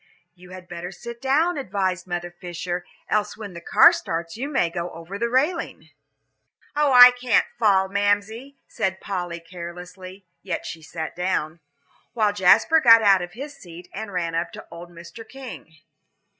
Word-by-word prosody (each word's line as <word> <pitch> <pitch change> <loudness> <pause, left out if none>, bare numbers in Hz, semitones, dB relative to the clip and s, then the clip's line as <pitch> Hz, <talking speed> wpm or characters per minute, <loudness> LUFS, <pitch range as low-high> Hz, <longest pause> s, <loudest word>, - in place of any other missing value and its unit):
"You 180 0 -17
had 185 -1 -11
better 175 +1 -7
sit 235 +5 -10
down," 300 +5 +1
advised 190 -6 -2
Mother 175 0 -4
Fisher, 175 0 -5 0.2
"else 210 -1 -1
when 205 -4 -8
the 170 - -9
car - - +6
starts 165 0 -4
you 265 +6 -4
may 270 - +1
go 175 0 -4
over 170 +5 -9
the 235 - 0
railing." 295 +8 -1 0.9
"Oh, 295 -1 +2
I 250 -1 +10
can't 245 -1 +1
fall, 195 -4 +3
Mamsie," 205 +7 -1
said 190 -4 -2
Polly, 175 -3 -4
carelessly, 180 +2 -10 0.2
yet 185 -3 -4
she 165 - -7
sat 160 0 -6
down, 170 -3 -2 0.5
while 215 -3 +1
Jasper 210 - +4
got 230 -3 +7
out 195 -2 +5
of 175 0 -7
his 280 +6 -8
seat 175 -7 -13
and 215 0 -6
ran 170 -3 -2
up 165 +1 -2
to - - -10
old 170 +1 -10
Mr. 170 +6 -11
King. 260 -10 -10
190 Hz, 165 wpm, -23 LUFS, 175-230 Hz, 0.9 s, I